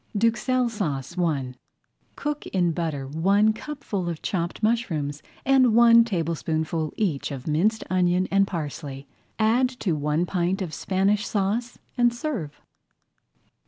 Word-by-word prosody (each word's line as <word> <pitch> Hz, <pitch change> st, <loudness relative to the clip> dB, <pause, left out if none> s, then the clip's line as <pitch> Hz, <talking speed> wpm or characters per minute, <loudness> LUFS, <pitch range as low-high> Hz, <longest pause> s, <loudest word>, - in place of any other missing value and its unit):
[Page 205 Hz, -, -2 dB
22] 230 Hz, -, +6 dB
DUXELLES 245 Hz, +1 st, 0 dB
SAUCE 170 Hz, -, -3 dB
I 140 Hz, -7 st, 0 dB, 0.6 s
Cook 295 Hz, 0 st, -4 dB
in 175 Hz, -3 st, +1 dB
butter 155 Hz, -5 st, -3 dB
one 195 Hz, +9 st, +3 dB
cupful 215 Hz, -8 st, -4 dB
of 165 Hz, -2 st, -6 dB
chopped 175 Hz, +2 st, -2 dB
mushrooms; 165 Hz, -, 0 dB, 0.2 s
and 255 Hz, -4 st, +4 dB
one 235 Hz, 0 st, +7 dB
tablespoonful 165 Hz, -5 st, -2 dB
each 175 Hz, -10 st, -1 dB
of 135 Hz, -3 st, -7 dB
minced 195 Hz, +9 st, +1 dB
onion 180 Hz, 0 st, +2 dB
and 195 Hz, 0 st, +4 dB
parsley. 145 Hz, -5 st, -5 dB, 0.3 s
Add 230 Hz, +4 st, +3 dB
to 185 Hz, -, 0 dB
one 150 Hz, +3 st, 0 dB
pint 180 Hz, +2 st, -1 dB
of 165 Hz, -4 st, -6 dB
Spanish 200 Hz, +2 st, +1 dB
Sauce 215 Hz, +4 st, -1 dB, 0.2 s
and 240 Hz, 0 st, +5 dB
serve. 235 Hz, -, -4 dB
185 Hz, 135 wpm, -25 LUFS, 160-220 Hz, 0.6 s, one